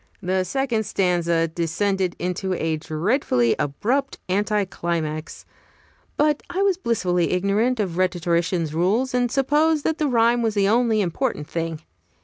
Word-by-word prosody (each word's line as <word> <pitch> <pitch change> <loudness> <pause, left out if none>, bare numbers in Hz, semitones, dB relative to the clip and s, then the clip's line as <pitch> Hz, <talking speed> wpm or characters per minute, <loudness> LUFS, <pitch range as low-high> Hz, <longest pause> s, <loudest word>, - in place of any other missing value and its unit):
The 185 -1 0
second 255 -2 -1
stanza 170 -3 +1
descended 175 +3 -1
in 180 +1 -2 0.2
a 160 -3 -1
dreadfully 155 - +1
abrupt 235 - -1
anti 205 +2 +1
climax; 160 -4 -4 0.7
but 300 0 +2
I 375 +3 0
was 395 -2 +3
blissfully 180 - 0
ignorant 205 +7 +1
of 185 -5 -2
rhetoricians' 175 -2 0
rules, 210 +11 +1
and 245 -1 +1
supposed 295 +3 +2
that 320 - -1
the 305 - +1
rhyme 235 -1 +3
was 225 -2 0
the 200 -1 +3
only 225 0 +3
important 180 - -2
thing. 165 -1 -4
195 Hz, 135 wpm, -23 LUFS, 170-245 Hz, 0.7 s, was